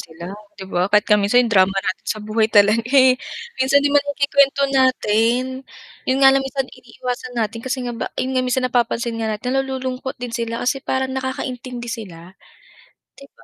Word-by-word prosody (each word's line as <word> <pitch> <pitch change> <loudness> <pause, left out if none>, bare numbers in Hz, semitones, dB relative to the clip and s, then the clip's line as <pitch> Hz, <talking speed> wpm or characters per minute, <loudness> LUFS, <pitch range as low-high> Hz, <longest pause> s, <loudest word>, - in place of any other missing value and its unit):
sila 170 +3 -9 0.2
di 190 - -8
ba, 180 0 -1
kahit 210 0 +3
nga 210 - +4
minsan 245 +5 +3
yung 225 - -3
drama 190 0 +4
natin 190 -1 -3
sa 215 - -1
buhay 215 +1 +1
talaga 210 +1 +4
eh, 260 -1 +6 0.5
minsan 280 +2 +3
di 285 - +3
ba 290 - +5
nake-kwento 280 -1 +2
natin? 255 0 +1 0.5
Yun 260 - +2
nga 270 - +8
lang 270 0 +2
minsan 270 0 -3
iniiwasan 250 0 -7
natin 225 0 -2
kasi 260 +2 -3
nga 245 - -3
ba - - -4
yun 260 - -2
nga 255 - +2
minsan 255 0 0
napapansin 235 -1 0
nga 220 - -1
natin 235 +4 -3
nalululungkot 260 -1 -4
din 245 -1 -7
sila 230 -1 -3
kasi 270 +2 0
parang 265 -1 -1
nakakaintindi 255 -2 -5
sila. 185 -7 -9 0.9
Di 275 - -13
ba? - - -21
250 Hz, 190 wpm, -20 LUFS, 220-265 Hz, 0.9 s, nga